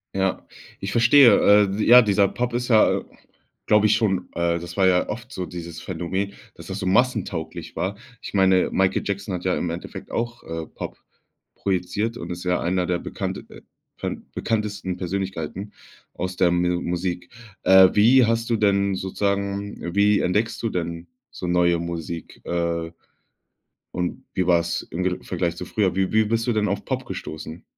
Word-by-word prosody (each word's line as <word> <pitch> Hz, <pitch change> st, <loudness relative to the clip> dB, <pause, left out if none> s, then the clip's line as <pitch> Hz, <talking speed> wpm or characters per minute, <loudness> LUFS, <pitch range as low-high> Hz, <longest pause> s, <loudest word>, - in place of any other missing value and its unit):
Ja, 95 Hz, -1 st, -1 dB, 0.3 s
ich 95 Hz, -, -4 dB
verstehe. 115 Hz, -4 st, +6 dB
Äh, 105 Hz, -, -1 dB
ja, 125 Hz, +1 st, +9 dB
dieser 100 Hz, -3 st, +3 dB
Pop 125 Hz, 0 st, -2 dB
ist 120 Hz, +1 st, -2 dB
ja, 110 Hz, -3 st, +4 dB, 0.6 s
glaube 105 Hz, 0 st, +4 dB
ich 105 Hz, -, +4 dB
schon 95 Hz, -5 st, 0 dB
äh, 85 Hz, 0 st, 0 dB
das 85 Hz, +2 st, -9 dB
war 95 Hz, -1 st, +4 dB
ja 90 Hz, -1 st, +2 dB
oft 120 Hz, +3 st, -6 dB
so 95 Hz, -7 st, -4 dB
dieses 85 Hz, -2 st, -8 dB
Phänomen, 95 Hz, +3 st, -3 dB, 0.2 s
dass -, -, -12 dB
das 95 Hz, +1 st, -5 dB
so 95 Hz, -, -4 dB
massentauglich 95 Hz, -5 st, -1 dB
war. 95 Hz, +3 st, -2 dB, 0.2 s
Ich -, -, -8 dB
meine, 95 Hz, -2 st, +4 dB
Michael 95 Hz, 0 st, +2 dB
Jackson 100 Hz, 0 st, -3 dB
hat 90 Hz, -1 st, -4 dB
ja 95 Hz, -, +1 dB
im 90 Hz, -, -2 dB
Endeffekt 85 Hz, +1 st, -8 dB
auch, 120 Hz, +1 st, -3 dB
äh, 80 Hz, -1 st, -5 dB
Pop -, -, -8 dB, 0.6 s
projiziert 100 Hz, +4 st, -1 dB
und -, -, -6 dB
ist 90 Hz, +1 st, -6 dB
ja 90 Hz, 0 st, +1 dB
einer 90 Hz, +1 st, 0 dB
der 90 Hz, 0 st, -1 dB
bekannte -, -, -4 dB
äh, -, -, -13 dB, 0.4 s
pen -, -, -5 dB
bekanntesten 105 Hz, -4 st, -2 dB
Persönlichkeiten 95 Hz, +1 st, -4 dB, 0.4 s
aus 90 Hz, 0 st, -4 dB
der 90 Hz, -2 st, +4 dB
Me 90 Hz, 0 st, +1 dB
Musik. 90 Hz, 0 st, -3 dB, 0.3 s
Äh, 95 Hz, 0 st, +8 dB
wie 120 Hz, +5 st, +6 dB
hast 115 Hz, +1 st, 0 dB
du 115 Hz, -, +2 dB
denn 100 Hz, -2 st, +2 dB
sozusagen 100 Hz, -1 st, -2 dB
wie 100 Hz, 0 st, +4 dB
entdeckst 105 Hz, +6 st, 0 dB
du 115 Hz, -, +1 dB
denn 85 Hz, -2 st, -4 dB, 0.2 s
so -, -, -7 dB
neue 85 Hz, -1 st, +3 dB
Musik? 85 Hz, -1 st, -6 dB
Äh, 85 Hz, -1 st, -2 dB, 1.0 s
und 90 Hz, -1 st, -3 dB
wie 90 Hz, -, 0 dB
war's 85 Hz, -1 st, +2 dB
im 90 Hz, +2 st, -3 dB
direkten 90 Hz, -1 st, -2 dB
Vergleich 85 Hz, -2 st, -1 dB
zu -, -, -7 dB
früher? 100 Hz, -4 st, 0 dB
Wie 95 Hz, +1 st, 0 dB
wie 110 Hz, 0 st, +4 dB
bist 115 Hz, +2 st, -1 dB
du -, -, +3 dB
denn 105 Hz, -2 st, +1 dB
auf 100 Hz, 0 st, -2 dB
Pop 130 Hz, -1 st, -3 dB
gestoßen? 80 Hz, -3 st, -7 dB
95 Hz, 175 wpm, -23 LUFS, 90-105 Hz, 1.0 s, ja